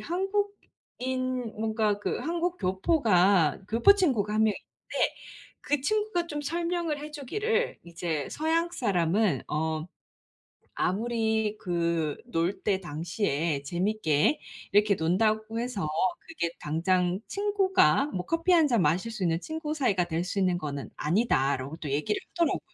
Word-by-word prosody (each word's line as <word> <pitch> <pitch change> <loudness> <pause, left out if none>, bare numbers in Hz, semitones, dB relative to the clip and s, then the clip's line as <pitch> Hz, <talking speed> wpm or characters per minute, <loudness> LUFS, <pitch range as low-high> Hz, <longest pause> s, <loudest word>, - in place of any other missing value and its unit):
한국인 260 - -3
뭔가 220 -2 +1
그 205 - -2
한국 345 +2 -1
교포가 190 - +3
교포 235 - +6
친구가 250 - +1
1 215 - +3
명 215 - +3
있는데 - - -3 0.5
그 290 -1 0
친구가 415 +1 0
좀 295 -3 -4
설명을 335 0 -1
해 300 +1 -7
주기를 425 - -1
이제 165 -4 -3
"서양 330 +2 0
사람은 190 - +1
어 155 +1 -1 1.0
아무리 220 +1 0
그 170 -4 -1
놀 180 -4 -1
때 195 -2 +1
당시에 165 -3 -2
재밌게 175 - +1 0.3
이렇게 205 0 +4
논다고 215 +6 +1
해서 230 -9 -2 0.4
그게 315 - -2
당장 180 +4 +1
친구가 390 - +3
뭐 185 -10 -4
커피 330 +2 +1
한잔 295 - +4
마실 180 +9 +1
수 215 -4 -4
있는 165 -2 +1
친구 315 - -4
사이가 215 - +1
될 165 0 -1
수 195 +2 -3
있는 185 -2 +2
거는 145 -4 -5
아니다."라고 150 - 0
또 155 - -6
얘기를 150 - 0
하더라고요. 340 -3 +1
215 Hz, 270 characters per minute, -28 LUFS, -, 1.0 s, 교포